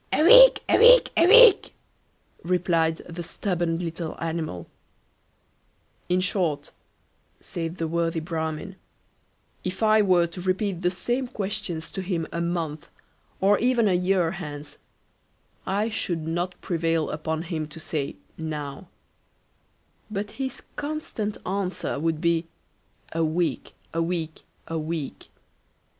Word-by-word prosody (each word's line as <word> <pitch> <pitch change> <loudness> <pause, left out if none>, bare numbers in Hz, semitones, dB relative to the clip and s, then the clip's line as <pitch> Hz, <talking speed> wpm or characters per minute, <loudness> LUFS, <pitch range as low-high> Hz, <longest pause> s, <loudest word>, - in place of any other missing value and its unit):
A - - +3
week, - - +9
a - - +4
week, - - +7
a 335 - +5
week, 470 0 +7 0.7
replied 165 -2 +1
the 175 0 -6
stubborn 175 -1 -2
little 165 -1 -5
animal. 160 - -4 1.4
"In 180 +1 +2
short, 170 -6 -1 0.7
said 165 +1 -5
the 165 - -2
worthy 165 0 -1
Bramin, 160 +3 -4 0.9
if 185 +4 -4
I 215 0 +5
were 180 -4 +4
to 170 +2 -8
repeat 185 0 -1
the 180 - +2
same 240 +8 -2
questions 200 -7 -4
to 190 - -4
him 175 -3 -2
a 170 - -3
month, 165 -3 -3 0.5
or 200 +2 +4
even 245 -2 +2
a 190 - +3
year 180 -1 +2
hence, 150 -5 -8 0.9
I 205 +3 0
should 170 -7 -2
not 175 +3 -3
prevail 165 -2 0
upon 160 +1 -3
him 160 -3 -4
to 155 +2 -10
say 150 -3 -3 0.2
now; 150 0 -5 1.2
but 205 0 -4
his 265 0 -4
constant 290 -8 -4
answer 190 -6 -2
would 160 0 -1
be, 170 0 +1 0.6
a 165 0 0
week, 160 -3 -1 0.2
a 165 - 0
week, 165 -2 -3 0.3
a 165 0 -3
week. 155 -2 -5
175 Hz, 125 wpm, -25 LUFS, 160-195 Hz, 1.4 s, week